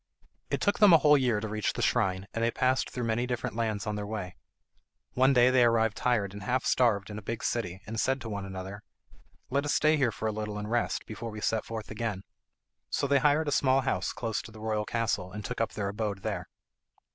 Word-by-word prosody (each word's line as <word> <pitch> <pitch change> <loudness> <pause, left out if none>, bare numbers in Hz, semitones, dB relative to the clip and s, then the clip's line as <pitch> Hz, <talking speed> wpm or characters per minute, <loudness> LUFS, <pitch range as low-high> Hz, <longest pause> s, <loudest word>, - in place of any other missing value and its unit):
It - - -1
took 205 - +1
them 205 -4 +8
a - - +10
whole 150 -1 +5
year 125 -6 +2
to 110 - -4
reach 110 -1 -1
the - - -3
shrine, 95 0 +1
and 115 - -1
they 115 - +3
passed 130 +2 +1
through 125 - -4
many 115 +2 0
different 120 -3 -3
lands 110 -3 -1
on 105 -1 -2
their 105 0 -4
way. 105 -4 -5 0.8
One 130 +2 +4
day 125 -1 +5
they 130 -1 +5
arrived 115 -2 +3
tired 110 -6 0
and 100 - -8
half 125 +5 -1
starved 105 -5 +2
in 105 - -5
a - - -11
big 115 +3 -5
city, 95 -6 -2
and 110 +1 -4
said 130 +3 +1
to 115 - -6
one 100 -2 -4
another, 95 +1 -7 0.7
"Let 140 +2 +1
us 145 0 0
stay 155 0 +4
here 130 -5 +2
for 110 - -3
a - - +1
little 105 -1 -4
and 105 0 -4
rest 120 0 0
before 115 +1 -6
we 105 -1 -7
set 110 +1 0
forth 110 -2 -6
again." 110 -3 -3 0.7
So - - 0
they 140 0 +3
hired 150 +3 +3
a - - 0
small 135 -1 +3
house 130 - -1
close 115 -5 -3
to 115 - -12
the 110 - -12
royal 110 -1 -1
castle, 110 -6 -1
and 105 +1 -7
took 125 +1 -3
up 115 - -1
their 100 -2 -2
abode 100 -2 -3
there. - - -3
115 Hz, 240 wpm, -29 LUFS, 105-125 Hz, 0.8 s, a